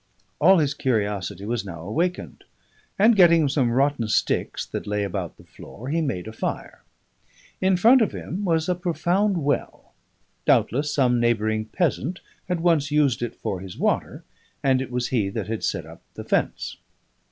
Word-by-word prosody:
All 185 +5 +6
his 145 -3 +1
curiosity 105 - -2
was 115 -1 -2
now 85 -5 -8
awakened, 165 - -3 0.5
and, 220 +3 +5
getting 170 -5 +6
some 135 -3 +1
rotten 135 -1 +1
sticks - - 0
that - - -6
lay 105 0 -1
about 100 -3 -4
the - - -16
floor, 125 +6 -11
he 165 +3 0
made 115 - -3
a 110 - -7
fire. - - -5 0.8
In 190 0 +3
front 240 +7 +6
of 220 - +2
him 195 +4 -5
was 165 -4 +1
a 180 - +2
profound 180 +1 0
well; 145 +1 -2 0.5
doubtless 145 +5 +2
some 125 -3 +2
neighbouring 110 -2 +1
peasant 170 - -1 0.3
had 180 -2 -1
once 165 -4 +2
used 145 -5 +2
it 120 - -3
for 95 - -4
his 95 -1 -9
water, - - -1 0.4
and 130 -1 +3
it 130 - -5
was 125 -1 -2
he 110 -6 0
that 105 0 -4
had 110 +1 -4
set - - -2
up - - -13
the - - -7
fence. - - -1
135 Hz, 170 wpm, -24 LUFS, 110-170 Hz, 0.8 s, All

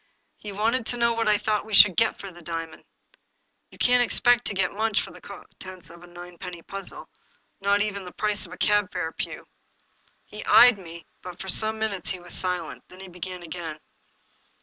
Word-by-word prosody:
He 210 - -8
wanted 225 +4 0
to 245 - -1
know 235 0 +3
what 230 -1 -1
I 210 -1 +5
thought 210 0 0
we 215 -2 -2
should 190 -3 +8
get 225 0 +2
for 195 - -8
the 175 0 -14
diamond. 165 -1 -6 0.8
"You - - -17
can't 245 0 +4
expect 245 0 +3
to 200 - -3
get 190 0 +1
much 215 0 +1
for - - -5
the - - -14
contents 185 -2 -10
of 170 0 -14
a 175 - -13
ninepenny 175 0 -9
puzzle, 195 0 -5 0.5
not 200 +1 +2
even 200 -2 -3
the 180 - -9
price 210 -1 -1
of - - -16
a 180 - -9
cab 205 -2 +2
fare, 165 -3 -3
Pugh." - - -6 0.8
He - - -8
eyed 245 - +8
me, 170 -2 -10 0.2
but 180 -1 -9
for 190 - -6
some 220 +3 +2
minutes 215 -4 -2
he 185 - -3
was 175 0 -7
silent. 180 -3 -2
Then 185 - -15
he 190 - -9
began 180 0 -7
again. 165 -2 -6
195 Hz, 200 wpm, -25 LUFS, 175-215 Hz, 0.8 s, should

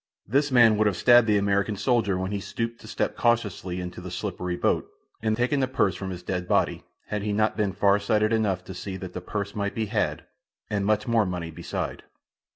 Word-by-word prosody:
This 140 +6 +2
man 115 -4 +6
would 110 0 +3
have 95 -4 0
stabbed 120 +1 +6
the 105 -1 +4
American 100 +1 +1
soldier 100 -2 +1
when 95 +1 -3
he 100 - -1
stooped 115 +4 -4
to - - -12
step 105 -1 -2
cautiously 105 -6 0
into 90 0 -6
the 90 - -7
slippery 90 -1 -3
boat, - - 0 0.3
and 110 -1 0
taken 125 +4 +1
the 130 - +2
purse 100 -7 +1
from 95 +2 -5
his 90 -1 -6
dead 90 -1 -3
body, - - +1 0.3
had 105 -1 -2
he 105 +1 -2
not 110 +1 +1
been 105 -3 0
far 100 +2 +3
sighted 105 +2 +1
enough 100 -5 +1
to 95 - -8
see 95 +1 -6
that 95 -2 -8
the 90 - -5
purse 100 +2 -4
might 100 -1 -2
be 110 - 0
had, 105 -1 -1 0.5
and 100 -1 0
much 105 +1 +1
more 115 -3 +3
money 85 -2 -4
beside. - - -4
100 Hz, 220 wpm, -26 LUFS, 95-110 Hz, 0.5 s, man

